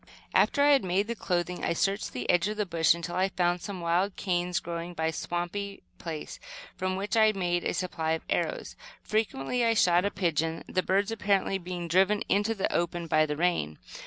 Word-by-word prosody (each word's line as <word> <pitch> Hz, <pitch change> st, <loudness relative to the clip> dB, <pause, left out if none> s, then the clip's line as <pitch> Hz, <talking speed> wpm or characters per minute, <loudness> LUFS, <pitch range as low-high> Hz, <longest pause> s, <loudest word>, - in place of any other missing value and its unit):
After 285 Hz, -, +4 dB
I 290 Hz, -, +6 dB
had 275 Hz, -2 st, +5 dB
made 185 Hz, +2 st, +1 dB
the 235 Hz, -, -3 dB
clothing, 180 Hz, -4 st, -2 dB
I 170 Hz, -, +1 dB
searched 195 Hz, +5 st, 0 dB
the 125 Hz, -1 st, -5 dB
edge 175 Hz, +2 st, +3 dB
of 210 Hz, 0 st, -3 dB
the 210 Hz, -, 0 dB
bush 165 Hz, -3 st, +3 dB
until 170 Hz, 0 st, -5 dB
I 190 Hz, +1 st, +2 dB
found 175 Hz, -1 st, 0 dB
some 190 Hz, 0 st, -6 dB
wild 175 Hz, +4 st, +1 dB
canes, 180 Hz, -2 st, 0 dB
growing 170 Hz, +1 st, -5 dB
by 160 Hz, -, -1 dB
a 160 Hz, -, 0 dB
swampy 185 Hz, +5 st, -4 dB, 0.2 s
place, 160 Hz, -3 st, -6 dB, 0.4 s
from 185 Hz, 0 st, -2 dB
which 200 Hz, +4 st, -2 dB
I 220 Hz, -1 st, +5 dB
made 175 Hz, -3 st, -1 dB
a -, -, -1 dB
supply 165 Hz, -3 st, -1 dB
of 160 Hz, -, -4 dB
arrows. -, -, -2 dB, 0.3 s
Frequently 215 Hz, -, -1 dB
I 230 Hz, -1 st, +3 dB
shot 180 Hz, -3 st, +4 dB
a 200 Hz, -, +1 dB
pigeon, 165 Hz, -3 st, -1 dB
the 185 Hz, -, 0 dB
birds 200 Hz, +4 st, +1 dB
apparently 200 Hz, -3 st, +1 dB
being 175 Hz, -1 st, -5 dB
driven 190 Hz, +5 st, +3 dB
into 205 Hz, +3 st, +2 dB
the 195 Hz, -, -1 dB
open 170 Hz, 0 st, -1 dB
by 155 Hz, -1 st, +3 dB
the 150 Hz, 0 st, -3 dB
rain. 160 Hz, -, 0 dB
180 Hz, 205 wpm, -28 LUFS, 170-200 Hz, 0.4 s, I